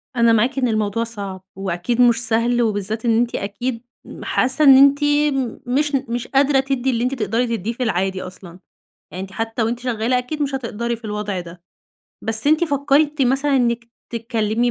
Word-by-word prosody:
أنا 235 -1 +4
معاكِ 240 +5 +1
إن 255 -2 +2
الموضوع 215 0 0
صعب 200 -5 -6
وأكيد 195 +5 -1
مش 240 -2 +6
سهل 235 +1 +1
وبالذات 215 0 -1
إن 225 -1 +3
أنتِ 240 0 0
أكيد 230 +4 -3 0.2
م - - -10
حاسة 265 +4 +1
إن 270 -1 +9
أنتِ 280 +1 +5
م 290 -4 +1
مش 285 +3 +1
ن 270 0 -1
مش 240 0 -3
قادرة 275 0 +3
تدّي 265 -1 -1
اللي 240 -2 0
أنتِ 255 - 0
تقدري 230 +1 -1
تدّيه 215 +4 -4
في 250 - -3
العادي 190 -3 -1
أصلًا. 180 -1 -10 0.5
يعني 185 - -5
أنتِ 195 0 -9
حتّى 225 +2 -2
وأنتِ 235 +2 -1
شغّالة، 245 0 0
أكيد 295 +5 -4
مش 275 -1 -2
هتقدري 235 -2 -3
في 230 - -20
الوضع 210 -3 -3
ده. 170 0 -11 0.6
بس 225 +3 0
أنتِ 310 +3 +4
فكّرتِ 285 0 +1
مثلًا 270 +2 +2
إنِّك 235 -1 +1 0.3
تتكلّمي 230 0 0
235 Hz, 190 wpm, -20 LUFS, 215-265 Hz, 0.6 s, إن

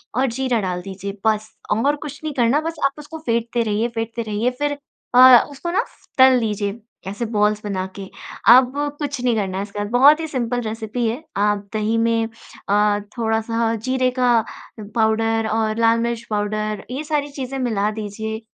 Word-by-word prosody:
और 260 - +2
जीरा 255 -2 0
डाल 180 -1 -3
दीजिए। 195 +1 -7
बस 215 0 +1 0.2
और 280 +7 +2
कुछ 290 -1 -8
नहीं 310 -2 -3
करना 250 +3 +2
बस 330 +1 -4
आप 275 - +3
उसको 300 +2 -9
फेंटते 235 -4 -1
रहिए 220 +1 0
फेंटते 230 +1 -3
रहिए 220 +2 -1
फ़िर 290 0 -1 0.4
अ, 255 -1 +9
उसको 315 +5 -5
ना 435 +6 +2 0.3
तल 260 -1 +7
दीजिए 210 -1 -2 0.3
ऐसे 205 +5 -3
बॉल्स 210 0 +1
बनाके। 190 -1 -5 0.4
अब 255 0 +5 0.3
कुछ 285 -3 -3
नहीं 245 -2 +2
करना 195 -2 -2
इसके 205 0 -6
बाद, 205 0 -3
बहुत 280 +5 +6
ही 320 - -3
सिंपल 245 -3 -2
रेसिपी 225 +1 -3
है। 235 +8 -3
आप 205 0 +1
दही 215 +1 0
में 230 0 +1 0.4
अ, 205 0 +3 0.2
थोड़ा-सा 225 0 0
जीरे 255 +3 0
का 250 -1 +4 0.6
पाउडर 225 0 +1
और 220 0 0
लाल 230 0 +4
मिर्च 235 0 -2
पाउडर, 215 0 -2
ये 270 +4 -3
सारी 295 -2 -1
चीज़ें 270 -1 -5
मिला 215 -5 0
दीजिए। 220 +1 -5
225 Hz, 170 wpm, -21 LUFS, 210-255 Hz, 0.6 s, अ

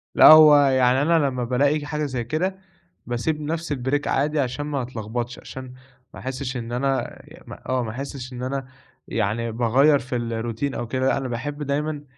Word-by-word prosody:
لأ، - - +8
هو 155 -1 +9
يعني 130 -1 +3
أنا 160 -1 +3
لمّا 125 -2 -2
بالاقي 140 +5 +1
حاجة 150 0 -2
زي 130 -4 -3
كده، 175 - -2 0.5
باسيب 135 +6 -2
نفس 160 +1 -3
الbreak 135 +2 -1
عادي، 150 +2 0
عشان 135 +2 -2
ما 145 -2 -2
أتلخبطش 120 0 -5
عشان، 130 -1 -9 0.4
ما - - -10
أحسش 130 0 -4
إن 115 -1 -6
أنا 130 +1 -2
ي - - -14
ما - - -10
آه، 130 -1 +1
ما 110 - -4
أحسش 130 +1 -7
إن 125 0 -6
أنا، 135 0 -3 0.4
يعني 115 +4 -1
باغيَّر 130 +6 +3
في 130 0 -5
الروتين 115 +3 -3
أو 120 - -4
كده، 130 +3 0
أنا 135 -1 -3
باحب 145 +5 -4
دايمًا 145 +1 -2
130 Hz, 180 wpm, -23 LUFS, 120-145 Hz, 0.5 s, هو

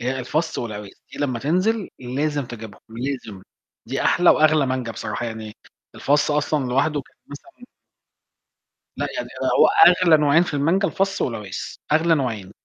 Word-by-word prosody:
هي 130 +2 -2
الفَصّ 155 +6 -2
والعويس، 105 -4 -6 0.2
دي - - -10
لمّا 130 -5 -1
تنزل 185 - 0
لازم 140 +3 -2
تجيبهم، 110 -4 -10
لازم 115 -4 -6 0.4
دي - - -3
أحلى 175 - +4
وأغلى 155 -2 +4
مانجا 130 -3 -3
بصراحة 110 +3 -4
يعني 110 -1 -7 0.4
الفَصّ 145 +2 +1
أصلًا 150 -1 0
لوحدُه 140 +4 0
كان - - -27
مثلًا 245 - -13 1.3
لأ، - - -1
يعني - - -4 0.3
هو - - +7 0.2
أغلى 175 -3 +5
نوعين 150 +3 +4
في 165 - -6
المانجا 170 +8 +1
الفَصّ 195 +1 -1
والعويس، 105 -6 -4 0.2
أغلى 160 +2 +3
نوعين. 110 -9 -3
140 Hz, 145 wpm, -22 LUFS, 120-155 Hz, 1.3 s, هو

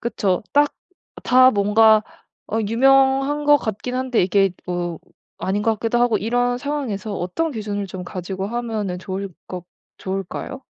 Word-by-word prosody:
그쵸. 205 -5 -1
딱 290 0 +3 0.5
다 255 +1 +6
뭔가 215 +1 +5 0.5
어 220 - -1
유명한 270 +4 +3
것 290 0 +6
같긴 240 0 -4
한데 255 -2 0
이게 195 +2 +3 0.2
뭐 175 -2 -3 0.4
아닌 200 +2 -1
것 225 - +2
같기도 230 +1 0
하고 240 -4 +3
이런 245 +4 0
상황에서 240 -8 -3
어떤 275 - -2
기준을 205 -3 -3
좀 185 0 -7
가지고 190 +2 -5
하면은 220 -6 -3
좋을 190 +1 -5 0.2
것 180 -1 -7 0.3
좋을까요? 195 +8 -5
220 Hz, 285 characters per minute, -21 LUFS, 195-255 Hz, 0.5 s, 다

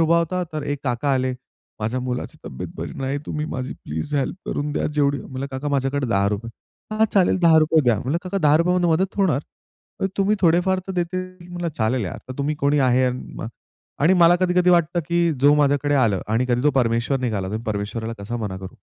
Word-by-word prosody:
उभा 165 +1 +4
होता 180 +2 -1
तर 155 -2 -3
एक 145 -1 -2
काका 130 +3 0
आले. 130 0 0 0.5
माझ्या 115 +4 -1
मुलाची 125 0 -4
तब्येत 65 - -6
बरी - - -5
नाही. 135 +2 -1
तुम्ही 150 0 -3
माझी 130 -3 -4
प्लीज 80 - -4
हेल्प 140 +4 -1
करून 145 +1 -2
द्या - - -1
जेवढी, 140 -2 +2
म्हणलं 135 +1 -5
काका 130 +2 -4
माझ्याकडे 135 -1 0
₹10 105 +1 0 0.4
हां, 220 +1 +4
चालेल 190 -1 +4
₹10 160 -1 +5
द्या. 120 -4 +3
म्हणलं 145 +7 -1
काका 190 +2 -2
₹10मध्ये 170 +3 +3
मदत 185 +4 +1
होणार, 185 -8 +2 0.6
मग 195 - +2
तुम्ही 200 +2 +2
थोडेफार 180 +2 +3
तर 190 - -4
देतील. 185 0 -4
म्हणलं 175 -1 -3
चालेल 110 +1 +1
यार, 90 - -5
तर - - -4
तुम्ही 145 +2 0
कोणी 145 0 +2
आहे 130 +1 +3 1.0
आणि 165 +5 +5
मला 175 -1 +6
कधी-कधी 180 0 +3
वाटतं 175 0 +3
की 170 -1 +2
जो 145 +1 +6
माझ्याकडे 145 0 +2
आलं 115 -9 +2
आणि 115 +4 +1
कधी 125 0 +1
तो 150 - +4
परमेश्वर 120 0 +1
निघाला 105 -7 -2
तर 110 - -2
परमेश्वराला 110 +2 -3
कसा 120 +4 -4
मना 105 -5 -4
करू? 95 0 -9
145 Hz, 195 wpm, -22 LUFS, 125-170 Hz, 1.0 s, मला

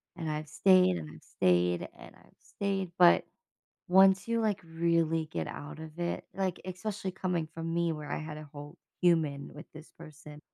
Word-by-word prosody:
and 165 -3 -4
I've 155 0 -3
stayed, 185 - +4
and 80 -2 -7
I've 80 - -15
stayed, 90 -1 +1
and - - -13
I've - - -23
stayed. 195 -3 -3
But, 175 -1 +6 0.6
once 190 +1 +5
you, 230 0 0
like, 215 -4 0
really 165 -1 +1
get 85 - -4
out 145 +1 -8
of 160 +1 -10
it, 175 0 -2
like, 190 -2 -2
especially 190 +1 -4
coming 180 -3 -2
from 165 0 -4
me, 170 -1 +1
where 150 -2 -7
I - - -1
had 155 -1 -6
a 155 - -9
whole 145 +3 -10 0.2
human 155 -5 +2
with 150 +3 -12
this 155 +1 -12
person, 150 -2 -12
165 Hz, 180 wpm, -30 LUFS, 150-185 Hz, 0.6 s, But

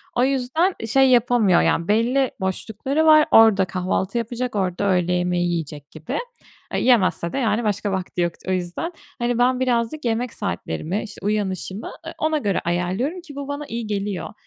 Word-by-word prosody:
O 245 - +3
yüzden, 275 +8 +1
şey 270 +3 +4
yapamıyor, 240 -6 +4
yani, 170 - +1
belli 240 +5 +2
boşlukları 220 - -1
var. 310 -1 +7
Orada 220 -4 +6
kahvaltı 185 +3 -2
yapacak, 240 0 -3
orada 190 +1 0
öğle 180 -1 +1
yemeği 180 0 0
yiyecek 150 -3 -5
gibi. 155 0 -5 0.6
Eee, - - +1
yemezse 190 -8 +2
de, - - -2
yani 230 -2 +1
başka 205 -1 -1
vakti 185 -1 -3
yok 175 -1 0
o - - 0
yüzden. 185 - -2 0.3
Hani, 240 0 0
ben 250 +1 +3
birazcık 250 +3 0
yemek 235 +1 -1
saatlerimi, 90 - -3
işte 205 -3 -10
uyanışımı, 200 -1 -2
eee, - - -6
ona 315 0 +1
göre 205 -9 0
ayarlıyorum, 185 - -1
ki 300 -5 -12
bu 280 -1 -5
bana 285 +1 -4
iyi 230 -2 -4
geliyor. 200 -5 -3
215 Hz, 170 wpm, -22 LUFS, 185-250 Hz, 0.6 s, var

